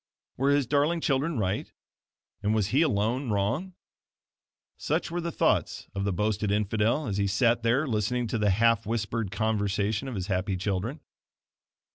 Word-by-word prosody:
Were 135 +2 +1
his 140 -1 +3
darling 145 +6 +2
children 145 +1 0
right, 95 -2 -1 0.7
and 105 +1 +1
was 105 -2 +1
he 135 +7 +3
alone 125 -2 +1
wrong? 120 - -1 1.0
Such - - -2
were 175 +1 -2
the 170 0 -3
thoughts - - +1
of 100 0 -2
the 100 - +1
boasted 105 +2 0
infidel, 105 +7 +1
as 100 -5 -2
he 100 -1 +1
sat 115 +5 +2
there 120 +6 +2
listening 120 0 0
to 115 - -1
the 105 -1 +2
half 115 +2 +3
whispered 115 -1 -2
conversation 105 +2 -1
of 130 - -5
his 95 -2 -3
happy 95 -1 -1
children. 100 - -2
110 Hz, 160 wpm, -27 LUFS, 100-130 Hz, 1.0 s, his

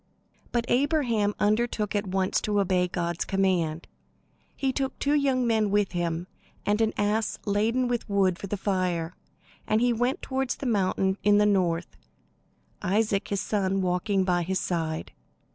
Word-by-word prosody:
But 235 -1 0
Abraham 245 -7 +1
undertook 215 0 +1
at 205 0 -1
once 190 0 0
to 210 -1 0
obey. 185 -2 +2
God's 170 -1 -2
command. 180 -5 0 0.7
He 265 -1 -1
took 270 -1 -2
two 285 - +1
young 270 -4 +2
men 220 -3 +2
with 205 -1 +1
him 170 -1 -2 0.4
and 210 +2 +1
an 220 -1 +2
ass 210 +1 0
laden 225 +5 +1
with 240 -2 -2
wood 190 -3 +2
for 200 - -6
the 205 - -3
fire; 180 -4 -1 0.5
and 215 - +2
he 245 +1 +3
went 245 +7 -1
toward 265 -1 -2
the 275 - -3
mountain 195 -3 +1
in 205 0 +4
the 210 - +4
north, 180 -4 0 0.8
Isaac, 205 +1 +1
his 200 -1 -1
son, 195 -2 0
walking 185 +2 +1
by 180 -1 +1
his 185 +2 -1
side. 160 -3 -2
205 Hz, 160 wpm, -27 LUFS, 185-225 Hz, 0.8 s, in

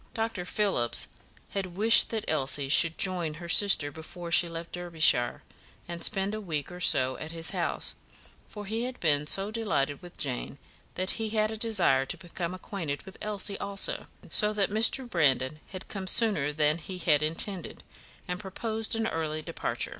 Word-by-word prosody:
Dr. 225 -5 -2
Phillips 185 - +1 0.4
had 185 -3 -4
wished 220 +4 +7
that 225 -2 -3
Elsie 140 -2 +1
should 165 +2 +4
join 175 -5 0
her 170 +2 -8
sister 170 -5 +4
before 170 +3 -8
she 175 0 +4
left 165 0 -7
Derbyshire, 160 -8 +1 0.4
and 170 -1 -4
spend 195 0 0
a 215 - -4
week 155 -5 -4
or 180 - -8
so 130 -6 +3
at 155 - -7
his 165 -1 +1
house, - - -1 0.6
for 210 -1 -8
he 225 +4 -2
had 255 0 -6
been 150 -3 +2
so 195 +6 0
delighted 190 -11 -1
with 175 -1 -13
Jane 135 0 -4 0.4
that 185 +1 0
he 220 - -1
had 215 0 +1
a - - -4
desire 190 - +2
to - - -2
become 175 0 -5
acquainted 170 -6 -5
with 190 - -12
Elsie 205 -1 -1
also; 200 0 -1 0.2
so 210 -1 +3
that 205 -1 +1
Mr. 230 +4 +3
Brandon 150 - +1
had 185 -1 -9
come 195 -2 -6
sooner 195 -11 +1
than 150 +1 +1
he 185 +3 -7
had 155 -4 +3
intended, 165 +4 0 0.4
and 180 0 -3
proposed 220 +3 -2
an 225 0 0
early 155 -5 -2
departure. - - -1
180 Hz, 175 wpm, -28 LUFS, 155-210 Hz, 0.6 s, wished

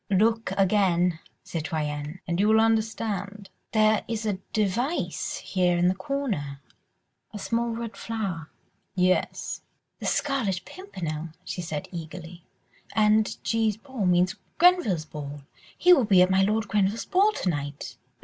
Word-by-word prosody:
"Look 220 +2 +2
again, 180 -4 +3 0.2
citoyenne, 155 0 -4
and 170 0 -1
you 205 - +4
will 220 0 +5
understand." 215 -3 -1 0.2
"There 215 -1 +3
is 225 -1 -3
a 200 -3 -1
device 215 - -1
here 180 -2 +1
in 175 +1 +4
the - - +2
corner, 190 - -3 0.7
a 215 - -7
small 230 +3 -1
red 230 -1 -5
flower.. 195 -9 -4 0.2
." - - -46
"Yes." 185 0 0 0.4
"The - - -4
Scarlet 230 -11 0
Pimpernel," 170 - -6 0.2
she 180 - -4
said 155 -3 -4
eagerly, 170 0 -8 0.5
"and 215 0 +3
G.'s 220 -2 +1
ball 245 -5 -3
means 180 +1 +3 0.2
Grenville's 335 - +4
ball.... 145 -2 -7 0.4
He 360 0 +7
will 270 -9 +4
be 190 -3 +6
at 185 - +1
my 190 0 +4
Lord 215 +2 +1
Grenville's 205 +2 +1
ball 400 +4 +4
to 185 - -1
night." 145 -3 -4
195 Hz, 140 wpm, -26 LUFS, 175-225 Hz, 0.7 s, He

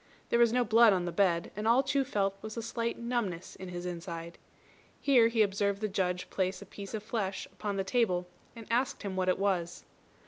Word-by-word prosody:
There 235 - +3
was 235 -1 +5
no 250 +1 +3
blood 225 0 +6
on 180 -2 0
the 175 - -2
bed, 170 -2 +1
and 210 +2 -2
all 245 +4 +5
Chu 275 0 +1
felt 200 -7 0
was 220 +1 -7
a 230 - -3
slight 230 +1 -2
numbness 235 -8 -3
in 185 -1 -8
his 175 0 -6
inside. 170 -1 -6 0.6
Here 250 -5 +5
he 225 -1 +3
observed 200 0 0
the 215 - -1
Judge 180 -3 -1
place 185 -1 -1
a - - -10
piece 200 +1 -8
of 210 - -5
flesh 210 -4 -2
upon 205 -2 -4
the 195 - 0
table, 190 -5 +1 0.3
and 230 -1 -9
asked 245 0 0
him 195 -2 -4
what 185 0 +1
it 185 - +2
was. 185 -4 -1
200 Hz, 215 wpm, -31 LUFS, 185-230 Hz, 0.6 s, blood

